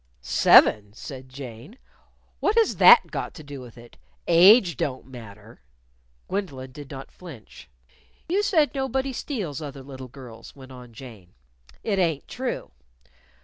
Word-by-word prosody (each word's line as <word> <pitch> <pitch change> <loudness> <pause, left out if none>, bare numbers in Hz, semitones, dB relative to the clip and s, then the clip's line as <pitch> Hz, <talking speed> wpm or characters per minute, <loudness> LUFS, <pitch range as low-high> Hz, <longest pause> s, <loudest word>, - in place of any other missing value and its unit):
"Seven?" 105 -1 +5
said 130 +2 -10
Jane. 130 - -11 0.6
"What 415 - 0
has 460 -1 +2
that - - +7
got - - -5
to 155 - -11
do 140 -2 -9
with 125 -2 -13
it? 120 0 -16 0.3
Age 180 - +6
don't 130 0 -4
matter." 110 - -13 0.7
Gwendolyn 140 -10 -5
did 145 +1 -11
not 135 -2 -9
flinch. 155 - -13 0.6
"You 380 +5 +1
said 325 -8 +2
nobody 265 -1 -2
steals 195 - -5
other 140 -3 -8
little 130 -1 -10
girls," 120 -3 -13
went 135 -1 -14
on 125 -2 -12
Jane. 110 -7 -13 0.5
"It 200 -3 -1
ain't 165 -6 -1
true. 255 - -5
135 Hz, 140 wpm, -24 LUFS, 125-195 Hz, 0.7 s, that